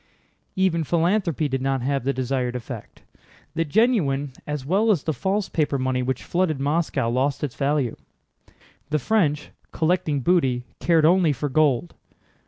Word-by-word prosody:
Even 185 -4 +1
philanthropy 170 - +1
did 135 -1 -2
not 135 -1 -1
have 140 -1 0
the 140 - +2
desired 130 -1 -2
effect. 120 -2 -8 0.5
The 165 - 0
genuine 150 - +1
as 150 -3 -4
well 200 +9 +2
as 185 -9 +2
the 160 - -1
false 195 +5 -1
paper 150 -3 0
money 130 -1 0
which 125 0 -2
flooded 170 -5 0
Moscow 145 -3 0
lost 130 +4 0
its 140 -4 -2
value. 140 -4 0 0.9
The 155 - +1
French, 150 - 0 0.2
collecting 160 -3 0
booty, 130 -6 +2 0.2
cared 165 -3 +3
only 170 -2 +4
for 145 +3 -3
gold. 150 +2 +2
150 Hz, 150 wpm, -23 LUFS, 135-170 Hz, 0.9 s, only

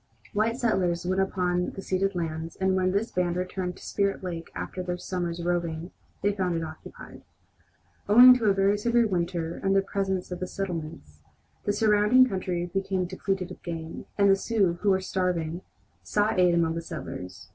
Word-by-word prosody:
White 225 +3 +1
settlers 180 -8 0
went 185 +1 +1
upon 180 -2 0
the 195 - -6
ceded 195 +1 0
lands, 160 -1 -4
and 190 0 +1
when 185 0 +2
this 205 +4 -1
band 180 -1 0
returned 180 0 -3
to - - -12
Spirit 200 -1 -1
Lake 170 -2 -5
after 185 - -5
their 180 -1 -3
summer's 175 -2 -3
roving 170 -1 -2 0.3
they 205 0 +2
found 185 -3 -1
it 165 - -2
occupied. 160 0 -10 0.9
Owing 250 +4 +10
to 225 - -1
a 200 - +5
very 195 +1 +2
severe 235 +2 +3
winter 170 -4 -2
and 195 0 +2
the 195 - +4
presence 190 -2 -2
of 180 - -4
the 185 - -3
settlements, 160 - -6 0.4
the 205 - +2
surrounding 215 +4 +4
country 185 -4 -2
became 190 +1 -1
depleted 190 0 -3
of - - -10
game, 165 -1 -6
and 200 -1 +4
the - - +6
Sioux, 195 -4 0
who 210 - +2
were 190 -1 +3
starving, 180 -3 -1 0.4
sought 210 -1 0
aid 180 -1 +5
among 165 -1 +2
the 165 - -3
settlers. 95 - -8
185 Hz, 180 wpm, -27 LUFS, 170-195 Hz, 0.9 s, Owing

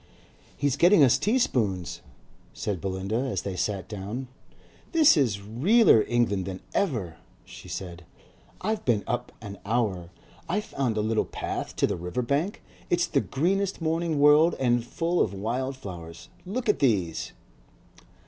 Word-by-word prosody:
"He's 145 -1 0
getting 175 0 +6
us 125 -2 +5
tea 220 +5 +2
spoons," 100 - -1 0.5
said 100 -5 -3
Belinda, 95 +2 -2
as 130 +1 -2
they 100 -2 -4
sat 95 +1 -2
down. 110 +5 -6 0.6
"This 315 - +6
is 125 - +2
realler 130 - +4
England 110 -6 +1
than 95 -1 -5
ever," 110 - -1 0.3
she - - -12
said. 85 -2 -6 0.6
"I've 215 +3 -1
been 110 -5 +1
up 120 - -3
an 100 -2 -8
hour. 100 -6 -1 0.4
I 185 +5 +1
found 135 - -2
a - - +2
little 110 +1 +1
path - - -4
down - - -14
to - - +2
the - - -2
river 90 +9 -3
bank. 145 - -1 0.3
It's 175 0 +2
the 140 - +1
greenest 190 +7 0
morning 165 -1 -1
world 150 +3 +6
and 120 -2 +2
full 170 +8 -1
of 100 - 0
wild 125 +7 -2
flowers. 85 -8 -9 0.2
Look 240 +5 -3
at 210 - +2
these." 100 - 0
120 Hz, 155 wpm, -26 LUFS, 100-165 Hz, 0.6 s, getting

